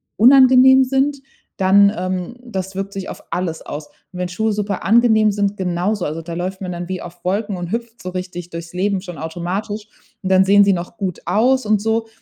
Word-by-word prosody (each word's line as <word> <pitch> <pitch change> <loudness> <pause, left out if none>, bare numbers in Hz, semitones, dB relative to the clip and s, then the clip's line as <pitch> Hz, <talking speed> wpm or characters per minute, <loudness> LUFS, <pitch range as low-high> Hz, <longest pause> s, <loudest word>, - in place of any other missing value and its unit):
unangenehm 260 +1 +7
sind, 270 +2 +1 0.4
dann 200 +1 +5
ähm, 185 +5 -3
das 190 -5 -5
wirkt 195 +1 -4
sich 195 -1 -5
auf - - -9
alles 170 -2 -2
aus. 150 +1 -7
Und 180 - -14
wenn 180 -1 -2
Schuhe 220 +4 -1
super 205 -2 -3
angenehm 220 -1 +4
sind, 200 0 -1
genauso, 185 +2 -1
also, 155 +2 -4
da 165 +1 -7
läuft 185 +3 -4
man 185 -1 -4
dann 175 0 -5
wie 185 -1 -4
auf 175 0 -11
Wolken 200 +1 -1
und 175 +1 -5
hüpft 235 0 -5
so 185 - -5
richtig 180 -1 -6
durchs 170 +1 -8
Leben 195 +1 0
schon 175 -3 -9
automatisch, 185 +6 -4 0.4
und 190 - -1
dann 190 0 +5
sehen 200 +1 +6
sie 200 -1 +4
noch 175 +5 -5
gut 185 -4 -3
aus 240 +8 +2
und 210 -1 +2
so. 225 +1 0
195 Hz, 205 wpm, -19 LUFS, 180-220 Hz, 0.4 s, unangenehm